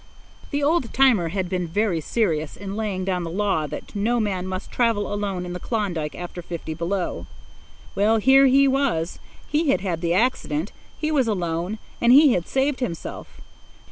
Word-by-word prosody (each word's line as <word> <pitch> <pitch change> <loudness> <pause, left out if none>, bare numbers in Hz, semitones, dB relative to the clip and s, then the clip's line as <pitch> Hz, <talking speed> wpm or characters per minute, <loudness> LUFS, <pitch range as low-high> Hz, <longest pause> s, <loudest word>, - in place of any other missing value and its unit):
The 285 -1 -1
old 295 -5 +1
timer 250 -10 +4
had 185 +1 -2
been 180 -1 -2
very 185 -1 0
serious 160 -6 -1
in 200 0 -6
laying 205 -4 -2
down 185 -2 -1
the 165 - -4
law 185 -4 0
that - - -8
no 230 +4 +1
man 190 -4 -1
must 185 +1 -5
travel 225 -4 +1
alone 200 -3 -2
in 175 - -5
the 180 - -5
Klondike 175 -9 -2
after 175 0 -7
fifty 170 -2 -6
below. 170 - -3 0.7
Well, 215 +3 +3
here 265 +5 +6
he 275 +1 +5
was; 265 -12 0 0.3
he 300 0 +1
had 270 - +2
had 175 -4 -2
the 170 0 +1
accident; 190 - 0 0.3
he 310 0 -1
was 270 -6 +2
alone; 175 0 -2 0.2
and 235 - +5
he 280 0 +7
had 175 - -1
saved 270 +1 0
himself. 175 -11 -6
200 Hz, 175 wpm, -23 LUFS, 175-245 Hz, 0.7 s, he